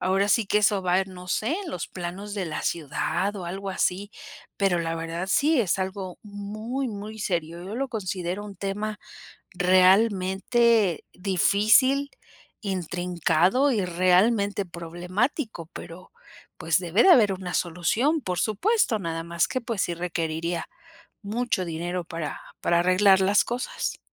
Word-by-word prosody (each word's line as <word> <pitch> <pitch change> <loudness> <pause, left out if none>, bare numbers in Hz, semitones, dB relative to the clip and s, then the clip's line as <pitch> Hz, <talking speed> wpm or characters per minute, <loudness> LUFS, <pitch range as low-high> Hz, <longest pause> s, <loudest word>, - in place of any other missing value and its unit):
Ahora 195 +2 +1
sí 210 +1 +3
que 210 - +3
eso 205 -1 +3
va 180 +1 +2
en 190 0 -5
no 180 0 -10
sé 215 +5 0 0.2
en 340 - -7
los 180 - -5
planos 185 +3 -6
de 195 -3 -2
la 155 - -4
ciudad 170 +5 -1
o 180 - -6
algo 195 +3 -5
así, 195 +2 -1 0.5
pero 195 -3 +2
la 165 0 -2
verdad, 165 +3 -4
sí 290 +3 +3
es 195 -3 0
algo 190 -1 -4
muy, 215 +6 -5
muy 215 0 -7
serio. 170 -3 -2
Yo 200 +4 -6
lo 270 +2 -2
considero 190 -3 -3
un 200 -1 -9
tema 210 +2 -3 0.5
realmente 190 +2 +3
difícil, 215 +9 +3 0.5
intrincado 180 - +1
y 205 -5 0
realmente 195 +4 +2
problemático, 175 - -3
pero 175 +3 -10 0.5
pues 165 -2 +2
debe 180 +3 +2
de 385 - +6
haber 215 - +6
una 180 -1 -6
solución. 215 - +1
Por 180 -3 -3
supuesto, 240 - +1
nada 165 -2 -3
más 170 -1 0
que, 255 - -2
pues, 230 -4 -2
sí 175 - -1
requeriría 170 -1 -3 0.6
mucho 215 -1 -1
dinero 175 +2 -3
para 165 -4 -5 0.2
para 170 0 +2
arreglar 190 +2 +5
las 200 +2 +4
cosas. 245 +1 -3
190 Hz, 145 wpm, -25 LUFS, 175-215 Hz, 0.6 s, de